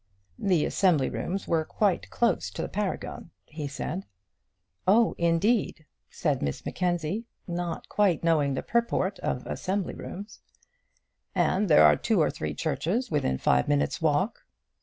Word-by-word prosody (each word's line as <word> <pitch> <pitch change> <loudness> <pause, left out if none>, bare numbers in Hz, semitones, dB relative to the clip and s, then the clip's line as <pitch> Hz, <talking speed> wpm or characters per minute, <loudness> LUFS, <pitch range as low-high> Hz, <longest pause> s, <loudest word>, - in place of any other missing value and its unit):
"The 180 -6 +2
assembly 170 -9 +2
rooms 195 +3 -3
were 165 -2 +2
quite 195 +3 0
close 235 -1 +1
to - - -5
the - - -2
Paragon," 195 -4 -4 0.2
he 150 -2 -6
said. 155 +6 -5 0.8
"Oh, 225 +4 +5
indeed!" 170 +1 +1 0.2
said - - -1
Miss 70 -1 -3
Mackenzie, 180 +4 -1 0.2
not 175 -1 -4
quite 195 -7 +2
knowing 150 -5 +2
the - - -3
purport 230 -5 0
of 125 - -2
assembly 190 0 -2
rooms. 205 +3 -8 0.9
"And 195 +1 +2
there 150 - +7
are - - +7
two 220 -4 +1
or 155 - +3
three - - -4
churches 165 - -1
within 140 - +1
five 65 0 +2
minutes' 70 0 +1
walk." - - +1
175 Hz, 140 wpm, -27 LUFS, 155-200 Hz, 0.9 s, there